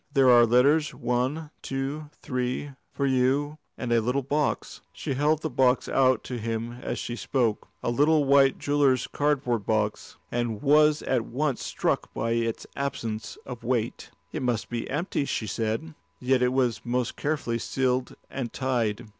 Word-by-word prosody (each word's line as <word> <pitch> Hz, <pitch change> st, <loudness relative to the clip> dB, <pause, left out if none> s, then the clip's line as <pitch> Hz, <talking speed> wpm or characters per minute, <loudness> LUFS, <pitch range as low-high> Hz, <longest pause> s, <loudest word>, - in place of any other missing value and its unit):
"There 135 Hz, -3 st, +5 dB
are 120 Hz, -1 st, +7 dB
letters, 140 Hz, +6 st, +3 dB
one, 130 Hz, +6 st, -1 dB
two, 140 Hz, +3 st, -4 dB
three, 130 Hz, +2 st, -2 dB, 0.2 s
for 140 Hz, -, -1 dB
you, 135 Hz, +3 st, +1 dB, 0.2 s
and 120 Hz, -2 st, -1 dB
a 115 Hz, -, +4 dB
little 125 Hz, +5 st, 0 dB
box." 145 Hz, +3 st, -1 dB
She -, -, -3 dB
held 150 Hz, +3 st, +1 dB
the 160 Hz, -, -1 dB
box 130 Hz, -1 st, +3 dB
out 130 Hz, -1 st, +3 dB
to 125 Hz, -2 st, -5 dB
him 115 Hz, +1 st, -3 dB
as -, -, -3 dB
she 120 Hz, -, -4 dB
spoke, 115 Hz, 0 st, 0 dB, 0.2 s
a -, -, 0 dB
little 150 Hz, +4 st, +4 dB
white 135 Hz, -1 st, +5 dB
jeweller's 140 Hz, -3 st, +2 dB
cardboard 130 Hz, -7 st, 0 dB
box, 105 Hz, -1 st, -1 dB
and 120 Hz, -3 st, -1 dB
was 150 Hz, +1 st, +4 dB
at 125 Hz, -4 st, 0 dB
once 140 Hz, +1 st, -1 dB
struck -, -, -1 dB
by 115 Hz, +1 st, -1 dB
its 115 Hz, -1 st, -1 dB
absence 115 Hz, -6 st, -4 dB
of 125 Hz, -2 st, -8 dB
weight. 120 Hz, -1 st, -1 dB, 0.2 s
"It 155 Hz, -, -3 dB
must 120 Hz, -3 st, -1 dB
be 120 Hz, -1 st, -3 dB
empty," 150 Hz, 0 st, -1 dB
she 115 Hz, -, -2 dB
said. 115 Hz, +9 st, -2 dB, 0.3 s
Yet 130 Hz, 0 st, +2 dB
it 125 Hz, 0 st, +3 dB
was 125 Hz, -3 st, +1 dB
most 120 Hz, 0 st, -1 dB
carefully 140 Hz, -6 st, -1 dB
sealed 130 Hz, +1 st, -1 dB
and 125 Hz, -4 st, -4 dB
tied. 120 Hz, -4 st, -1 dB
130 Hz, 165 wpm, -26 LUFS, 120-140 Hz, 0.3 s, are